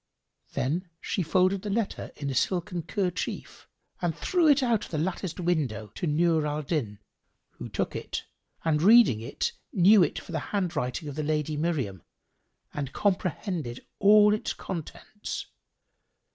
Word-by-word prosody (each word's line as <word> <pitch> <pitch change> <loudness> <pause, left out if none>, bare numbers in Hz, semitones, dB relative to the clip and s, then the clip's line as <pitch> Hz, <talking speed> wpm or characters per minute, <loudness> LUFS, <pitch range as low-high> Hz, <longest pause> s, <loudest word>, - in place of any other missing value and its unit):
Then 170 +8 -1
she 195 - -2
folded 185 +3 +2
the 210 - -5
letter 215 +1 -2
in 140 -2 -3
a - - -3
silken 175 +5 0
kerchief 180 +1 -3 0.3
and 170 -3 -1
threw 350 -3 +2
it 285 -2 +5
out 235 -4 +2
of - - -13
the 160 - -3
latticed 175 +2 -2
window 140 - -1
to 175 - -3
Nur 160 0 +2
al 150 +1 -2
Din, 135 -10 -2 0.5
who - - -8
took - - -2
it - - -4 0.4
and 155 -2 +2
reading 210 - +7
it, 115 - -2 0.2
knew 200 +2 +6
it 165 - +2
for - - -8
the - - -1
handwriting 165 -7 -2
of 145 - -5
the 155 - -3
Lady 150 0 -1
Miriam 145 - -1 0.7
and 140 -2 -4
comprehended 180 - -1
all 210 +1 +7
its 215 - -2
contents. 190 +4 -6
170 Hz, 150 wpm, -27 LUFS, 150-195 Hz, 0.7 s, reading